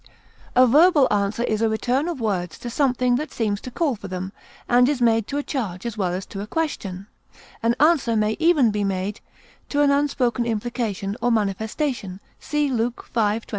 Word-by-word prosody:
A 255 +1 +7
verbal 295 +2 +5
answer 205 +3 0
is 215 -2 -1
a 225 - +3
return 250 +7 0
of 340 -6 -3
words 185 -7 -2
to 240 - -7
something 250 -2 +2
that 300 +1 -4
seems 210 -3 -1
to - - -7
call 275 +1 0
for 200 -2 -9
them, 185 0 -5 0.4
and 245 +1 +4
is 290 -3 0
made 225 -3 +2
to 285 - -3
a 290 - -1
charge 210 - -4
as 235 -3 -3
well 190 -5 -1
as 185 +2 -4
to 195 - -7
a 205 - -6
question; 210 - -3 0.6
an 230 0 +2
answer 295 -7 +3
may 215 0 +2
be 320 - -6
even 295 -10 +4
made 195 +1 -3 0.5
to 290 - +1
an 285 - +4
unspoken 275 -4 +1
implication 220 -3 -2
or 240 - +2
manifestation; 215 0 -2 0.2
see 295 -1 -1
Luke 240 0 -1
v, 220 -1 +1
22. - - -25
235 Hz, 195 wpm, -23 LUFS, 205-270 Hz, 0.6 s, A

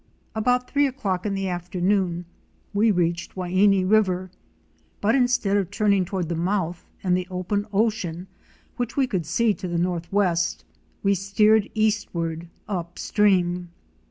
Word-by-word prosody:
About 250 +3 +1
three 285 0 +2
o'clock 210 -8 -2
in 200 - -1
the 195 0 -2
afternoon 180 0 -1 0.5
we 210 +3 +3
reached 175 -3 0
the 185 - -4
Waini 185 +1 +3
River, 185 -3 +2 0.7
but 215 +2 +2
instead 245 -6 +2
of 195 -3 -1
turning 205 -2 +2
toward 185 -2 -3
the 170 - -2
mouth 175 0 -2
and 180 -2 +2
the 180 0 -2
open 190 +3 -2
ocean 195 -5 0 0.5
which 245 +1 -3
we 275 - +4
could 185 -10 -3
see 215 +7 +2
to 185 - -6
the 175 -1 -2
northwest, 170 - 0 0.4
we 200 0 +4
steered 205 +3 +3
eastward 175 -7 -1 0.2
up 175 -4 -4
stream. 180 -4 +1
190 Hz, 145 wpm, -24 LUFS, 175-210 Hz, 0.7 s, we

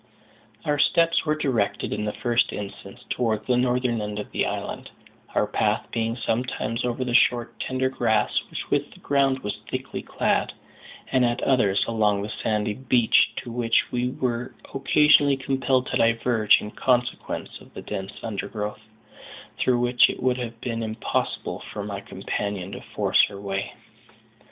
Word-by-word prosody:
Our 145 -1 +1
steps 165 +2 +3
were 155 - +2
directed, 130 -9 -1
in 105 +1 -2
the 105 - -1
first 120 +1 +1
instance, 100 +3 -8
towards 110 -3 0
the 125 - +2
northern 125 -2 +1
end 105 0 -4
of 105 - -6
the - - 0
island; - - -5 0.5
our - - +3
path - - 0
being 115 0 -1
sometimes 115 -1 -2
over 125 +1 -1
the 125 - -2
short 120 -1 +3
tender 130 0 0
grass 110 -5 +1
with - - -7
which - - +1
the - - -16
ground 135 -2 +1
was 105 - -3
thickly - - -4
clad, - - 0 0.6
and 130 - +3
at 120 +1 0
others 105 -8 +3
along 105 -3 +1
the 105 - -5
sandy 105 -1 0
beach, 125 -1 +3
to 120 - -8
which 115 -1 +1
we 125 0 0
were 125 -2 -3 0.2
occasionally 140 0 +5
compelled 130 -1 +1
to - - +1
diverge 115 -1 +4
in 105 - -7
consequence 125 0 -1
of - - -16
the - - -7
dense 95 +1 -5
undergrowth, 105 -1 -4 0.8
through 125 -1 +2
which 120 0 +4
it - - -5
would 130 -1 +2
have 115 -2 -5
been 115 -2 -3
impossible 110 0 -2
for 105 - -5
my 100 -1 -4
companion 100 -1 -4
to 100 - -7
force - - +2
her 100 - -9
way. 95 -1 -3
120 Hz, 160 wpm, -25 LUFS, 105-125 Hz, 0.8 s, occasionally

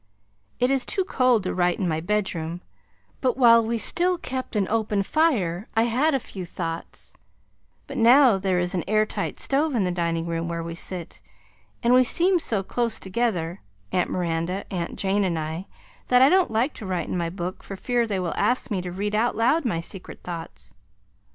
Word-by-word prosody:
It 250 +2 +2
is 270 -2 +2
too 385 - 0
cold 255 - +2
to 185 - -2
write 175 -1 +1
in 190 - -1
my 160 -1 0
bedroom 175 -3 -2 0.6
but 255 -2 +1
while 230 -3 +6
we 230 +1 -1
still 355 - +2
kept 260 -7 -5
an 200 -3 +1
open 210 -2 0
fire 210 - +1
I 225 - +4
had 260 +6 +2
a - - +1
few 195 -5 -8
thoughts, 170 -1 -6 0.7
but 275 - -7
now 240 -2 +6
there 190 -1 0
is 180 +1 0
an 180 - -1
air 215 0 +3
tight - - -4
stove 285 +1 0
in 220 - +2
the 180 - 0
dining 170 -1 -1
room 165 0 -2
where 170 0 -3
we 165 0 -5
sit, 175 0 -3 0.6
and 235 +1 +4
we 255 0 +7
seem 355 +8 +3
so 215 -11 -1
close 230 +2 0
together, 190 -4 -2 0.3
Aunt 180 - +1
Miranda, 175 +2 -2
Aunt 175 -2 -3
Jane 200 +1 +1
and 175 -3 0
I 160 +4 -4 0.4
that 250 +1 +5
I 270 - +7
don't 370 +1 +3
like 230 +6 0
to 215 - -8
write 185 -2 -2
in - - -3
my 170 -2 -1
book 180 +1 -5
for 195 - -8
fear 240 +3 0
they 200 -3 -1
will 175 -4 -2
ask 245 -1 0
me 190 -3 0
to 180 0 -6
read 205 +3 -3
out 225 +3 +1
loud 280 +7 +2
my 175 -9 0
secret 180 +2 -7
thoughts. 165 - -7
200 Hz, 200 wpm, -24 LUFS, 175-245 Hz, 0.7 s, we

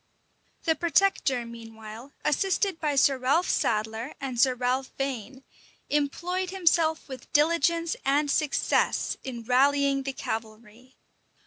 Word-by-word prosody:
The 325 - +3
protector, 320 -6 +1
meanwhile, 225 +1 -10
assisted 380 +2 +1
by 300 -2 0
Sir 270 -1 +4
Ralph 280 +8 +2
Sadler 220 +4 -1
and 260 -4 -4
Sir 255 -1 +4
Ralph 250 +2 -1
Vane, 265 -1 -4 0.5
employed 345 +6 -1
himself 335 -4 +1
with 260 -3 -10
diligence 335 +2 +2
and 285 +1 +2
success 295 -1 +1
in 240 -3 -6
rallying 275 +3 +3
the 270 0 -4
cavalry. 225 +2 -7
275 Hz, 115 wpm, -27 LUFS, 245-315 Hz, 0.5 s, Sir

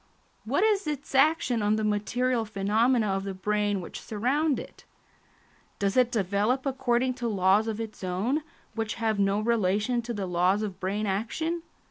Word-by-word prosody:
What 280 - +1
is 415 -5 +2
its 290 -2 -4
action 270 -4 +3
on 210 +1 +2
the 215 - -1
material 230 +4 0
phenomena 220 +3 +1
of 195 0 -1
the 195 -1 -5
brain 205 0 0
which 175 - -8
surround 265 +7 0
it? - - -11 0.9
Does 200 -1 0
it 250 -1 +4
develop 215 +4 0
according 260 -2 +1
to 240 - 0
laws 200 +1 +3
of 220 -1 -3
its 220 -3 -6
own, 200 - 0 0.3
which 225 -1 -3
have 220 -2 0
no 200 +1 +2
relation 215 +1 +1
to 235 +1 -6
the 200 -2 -2
laws 180 +3 +2
of 195 -3 -5
brain 200 +3 -1
action? 235 - -2
220 Hz, 165 wpm, -27 LUFS, 200-255 Hz, 0.9 s, it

